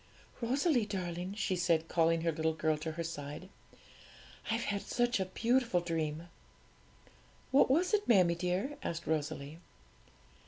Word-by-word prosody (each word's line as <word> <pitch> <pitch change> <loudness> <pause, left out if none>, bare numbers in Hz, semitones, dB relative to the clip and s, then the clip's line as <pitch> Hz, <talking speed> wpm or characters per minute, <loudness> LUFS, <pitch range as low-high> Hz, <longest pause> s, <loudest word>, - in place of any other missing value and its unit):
'Rosalie 255 0 +2
darling,' 180 -1 -4
she 200 -3 0
said, 170 -2 +1
calling 165 -1 +2
her 165 0 +1
little 160 0 -1
girl 155 -1 +1
to 155 +1 -5
her 170 +1 -3
side, 150 +2 -6 1.0
'I've 230 +2 0
had 200 -1 -1
such 240 -2 0
a 190 - 0
beautiful 230 +1 +1
dream!' 165 -1 -3 1.2
'What 270 0 +5
was 345 +9 +2
it, 420 -1 +2
mammie 185 -7 +5
dear?' 180 +11 -2
asked 170 0 -4
Rosalie. 155 0 -3
175 Hz, 135 wpm, -33 LUFS, 160-225 Hz, 1.2 s, What